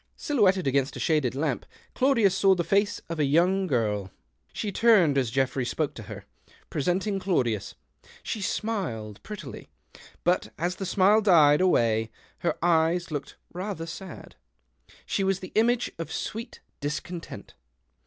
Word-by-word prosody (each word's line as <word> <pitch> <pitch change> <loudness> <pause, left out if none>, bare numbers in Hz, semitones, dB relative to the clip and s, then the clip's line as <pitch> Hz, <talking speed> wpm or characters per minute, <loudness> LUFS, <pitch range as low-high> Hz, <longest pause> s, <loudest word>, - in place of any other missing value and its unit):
Silhouetted 195 - +2
against 135 0 +1
a - - -6
shaded 150 -6 +1
lamp, 140 -2 -1 0.3
Claudius 235 -8 +3
saw 195 -1 +4
the 175 - -1
foce 200 +3 +1
of 165 -1 -5
a - - +3
young 180 +7 +2
girl. 105 - 0 0.4
She 210 - -3
turned 195 -9 +4
as 130 -4 +1
Geoffrey 130 +1 0
spoke 150 +4 -2
to 115 - -9
her, - - -8 0.5
presenting 190 +6 0
Claudius. 125 - -1 0.5
She 215 - -4
smiled 160 - -3
prettily; 205 - -9 0.5
but 175 +1 +1
as 175 +2 -2
the 195 - -4
smile 200 +3 +4
died 160 -6 +5
away 115 -11 +2 0.3
her - - -1
eyes 170 0 +2
looked 145 -2 -5 0.2
rather 180 -2 -4
sad. 185 +3 -9 0.7
She 195 - -1
was 190 -1 +1
the 185 - -9
image 235 +2 +2
of 165 - -5
sweet 230 +2 -5 0.2
discontent. 165 +4 -6
175 Hz, 145 wpm, -26 LUFS, 140-195 Hz, 0.7 s, died